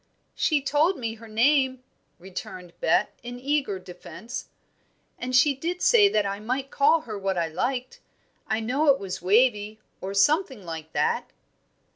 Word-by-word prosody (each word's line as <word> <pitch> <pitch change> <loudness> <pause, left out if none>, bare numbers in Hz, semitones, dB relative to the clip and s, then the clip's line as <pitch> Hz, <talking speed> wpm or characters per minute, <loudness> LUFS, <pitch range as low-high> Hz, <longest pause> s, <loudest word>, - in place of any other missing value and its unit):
"She 295 -4 +1
told 305 +6 +2
me 230 -3 -3
her 225 0 -13
name," 260 +3 +2 0.3
returned 180 0 -8
Bet, - - +2
in 245 0 -8
eager 270 -6 0
defence, 185 +6 -9 0.7
"and 255 0 -2
she 280 +3 +5
did 335 +7 -4
say 425 -4 +6
that 210 - +1
I 200 0 -3
might 255 +5 -3
call 310 +3 +4
her 215 -7 -7
what 195 -1 -1
I 165 -1 0
liked. 250 +9 -3 0.5
I 220 0 0
know 265 +7 0
it 275 -1 +6
was 190 -6 -6
Wavie, 210 +1 +2 0.2
or 195 +1 -5
something 265 - +2
like 160 -2 -6
it." - - +1
245 Hz, 155 wpm, -25 LUFS, 195-280 Hz, 0.7 s, say